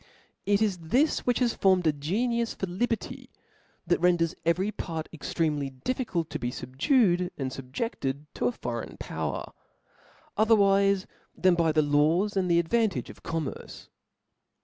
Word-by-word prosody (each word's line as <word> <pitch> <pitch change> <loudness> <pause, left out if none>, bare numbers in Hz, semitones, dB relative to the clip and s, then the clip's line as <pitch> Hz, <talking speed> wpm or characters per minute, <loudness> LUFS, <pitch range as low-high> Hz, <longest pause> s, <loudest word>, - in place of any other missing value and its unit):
It 205 +1 +3
is 195 -4 0
this 250 - +1
which 245 - +3
has 245 -2 +1
forteed 185 -2 +3
a 155 - +4
genitia 230 - -1
for - - -1
liberty, 215 +5 -3 0.6
that 175 0 +2
renders 170 -2 +2
every 185 +5 +2
part 160 -6 -5
extremely 150 -3 -1
diffi^tdttobe 165 - -3 0.2
fubducd 180 - +2
and 135 -2 -3
fubjcded 135 - -4
to - - 0
a - - +1
foreign 120 -1 -5
power, - - -4 0.9
othcr 220 +1 +5
;Wife 195 -1 +3 0.3
than 185 -1 +4
by 165 -2 +2
the 155 0 +3
laws 155 +8 +2
<aad 190 -2 +1
the 170 - +4
advantage 205 +4 +1
of - - -17
com 165 -1 -2
merce. - - -9
175 Hz, 145 wpm, -27 LUFS, 155-210 Hz, 0.9 s, othcr